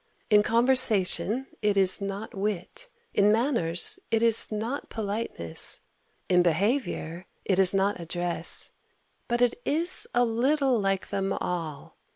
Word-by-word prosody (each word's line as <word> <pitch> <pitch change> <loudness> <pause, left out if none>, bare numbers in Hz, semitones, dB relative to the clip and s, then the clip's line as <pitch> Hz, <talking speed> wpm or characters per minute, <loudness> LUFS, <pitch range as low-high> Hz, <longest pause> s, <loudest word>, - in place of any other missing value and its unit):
In 210 0 +6
conversation 230 0 +1 0.2
it 205 -1 0
is 190 0 +3
not 200 +2 -6
wit; 205 - -4 0.2
in 205 +1 +3
manners 225 - +2
it 225 0 +1
is 230 -1 +3
not 225 +6 -4
politeness; 205 - 0 0.5
in 180 -1 +3
behaviour 180 - -1 0.2
it 190 -1 +1
is 190 -2 +6
not 195 0 0
address; 175 +1 +1 0.6
but 240 0 0
it 245 - 0
is 335 +5 +1
a 245 0 +3
little 260 +2 +1
like 195 -1 -2
them 195 -1 -2
all. 160 -5 -5
210 Hz, 130 wpm, -26 LUFS, 185-240 Hz, 0.6 s, In